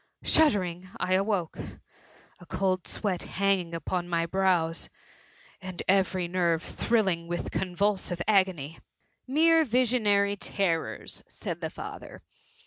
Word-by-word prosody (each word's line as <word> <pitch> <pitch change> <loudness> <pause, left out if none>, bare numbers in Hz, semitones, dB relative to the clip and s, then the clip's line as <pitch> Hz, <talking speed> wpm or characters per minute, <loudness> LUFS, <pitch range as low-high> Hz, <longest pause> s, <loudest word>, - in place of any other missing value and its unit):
— - - -30
Shuddering 185 - +3
I 185 - 0
awoke 190 -3 0 0.4
— - - -28
a 175 - -13
cold 185 -2 -1
sweat 195 -5 -1
hanging 190 -4 0
upon 175 +1 -3
my 165 -1 +1
brows, 175 -3 +1 0.7
and 185 -2 -6
every 185 -2 +2
nerve 170 -2 +1
thrilling 190 -8 0
with 175 0 -3
convulsive 190 -1 -1
agony. 185 -7 +1
^^ - - -29 0.5
Mere 325 +2 +5
visionary 220 -6 +2
terrors," 190 -5 -2
said - - -6
the - - -2
father. - - -9
185 Hz, 125 wpm, -28 LUFS, 175-200 Hz, 0.7 s, Mere